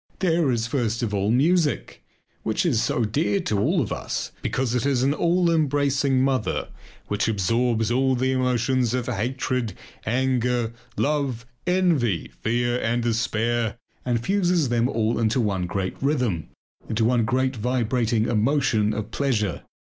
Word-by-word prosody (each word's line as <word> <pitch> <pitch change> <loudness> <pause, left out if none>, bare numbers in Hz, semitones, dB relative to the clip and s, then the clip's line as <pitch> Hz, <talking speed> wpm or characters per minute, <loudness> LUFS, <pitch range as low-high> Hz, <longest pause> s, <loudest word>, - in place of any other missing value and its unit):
There 165 -5 +2
is 115 -2 0
first 115 -1 -1
of 105 -3 -2
all 100 0 0
music, 150 +6 +1 0.4
which 110 +10 -1
is 125 -10 +2
so 120 - 0
dear 150 - 0
to 105 - -1
all 100 - +2
of - - -2
us - - -4
because 130 -2 -1
it 125 - 0
is 135 -3 +1
an 140 +2 +3
all 170 +2 +2
embracing 140 -3 +2
mother 130 -4 0 0.4
which 105 +2 -1
absorbs 115 +2 +1
all 130 +1 +2
the 130 +1 +1
emotions 125 -1 +1
of 125 -2 -1
hatred, 125 0 -2 0.3
anger, 125 -1 0 0.2
love, 140 -6 0 0.2
envy, 160 - +1
fear, 120 - 0
and 120 +1 0
despair, 115 -1 0 0.3
and 120 -2 -1
fuses 180 -7 +2
them 120 +1 +1
all 115 -2 0
into 115 +3 +1
one 95 -6 0
great 95 0 -3
rhythm, 125 - 0 0.4
into 110 +1 +1
one 120 0 +3
great 130 +4 0
vibrating 120 -1 0
emotion 115 -2 +1
of 105 0 -4
pleasure. 110 - -1
120 Hz, 150 wpm, -24 LUFS, 110-135 Hz, 0.4 s, an